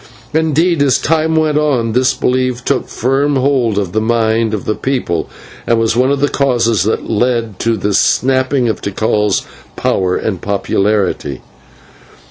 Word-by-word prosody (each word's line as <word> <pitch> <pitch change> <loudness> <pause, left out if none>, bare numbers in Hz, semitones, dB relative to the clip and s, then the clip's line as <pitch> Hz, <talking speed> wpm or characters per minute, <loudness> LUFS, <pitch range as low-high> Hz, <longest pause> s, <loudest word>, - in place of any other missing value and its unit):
Indeed, 160 +1 +1
as 140 -3 +3
time 160 +1 0
went 155 -1 +2
on, 130 -7 0
this 125 +3 +2
belief 125 -1 -1
took - - 0
firm 135 +4 0
hold 130 -5 +1
of 100 -4 -1
the 110 - 0
mind 110 0 +1
of 105 -3 -4
the 110 - 0
people, 120 -11 -2 0.4
and 115 - +3
was 115 0 +1
one 130 +2 +2
of 140 -1 0
the 145 - +3
causes 120 -7 +1
that 110 - -1
led 115 -2 -1
to 115 -1 0
the 105 +1 -1
sapping 130 +4 +2
of 110 - -2
Tikal's 105 0 0 0.3
power 90 -1 0
and 95 -6 -3
popularity. 100 -7 -1
120 Hz, 155 wpm, -15 LUFS, 110-135 Hz, 0.4 s, as